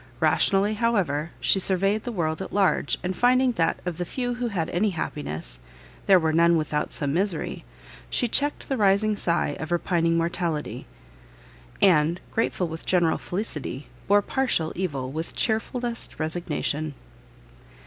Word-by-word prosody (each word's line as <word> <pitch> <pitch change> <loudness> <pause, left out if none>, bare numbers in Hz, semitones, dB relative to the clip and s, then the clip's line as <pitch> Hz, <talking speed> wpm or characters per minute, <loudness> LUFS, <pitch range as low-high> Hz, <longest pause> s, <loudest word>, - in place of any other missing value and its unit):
Rationally, 200 +2 +3
however, 195 -9 0
she 195 - +2
surveyed 195 +3 +2
the 245 - -3
world 160 -5 -2
at 190 - -6
large, 195 -7 +2
and 185 +1 -2
finding 255 +1 +3
that 165 -8 0
of 175 -1 -4
the - - 0
few 245 +6 -3
who 245 0 -2
had 180 -8 -2
any 200 +5 +1
happiness, 140 - -4 0.5
there 195 - +7
were 160 -2 +1
none 170 +1 +4
without 155 -1 -1
some 140 -1 -2
misery, 185 -1 -1 0.5
she 245 - +1
checked 290 +5 +1
the 270 - -1
rising 210 +1 +3
sigh 170 -6 0
of 160 +2 -6
repining 170 -1 +1
mortality, 170 -2 -2 1.0
and, 170 -2 +4
grateful 205 -5 0
with 160 0 -7
general 175 -3 +2
felicity, 155 - -5 0.2
bore 205 +1 +4
partial 235 -13 0
evil 140 -8 -3
with 160 +3 -5
chearfullest 235 +2 -1
resignation. 155 -2 -2
180 Hz, 145 wpm, -25 LUFS, 160-210 Hz, 1.0 s, there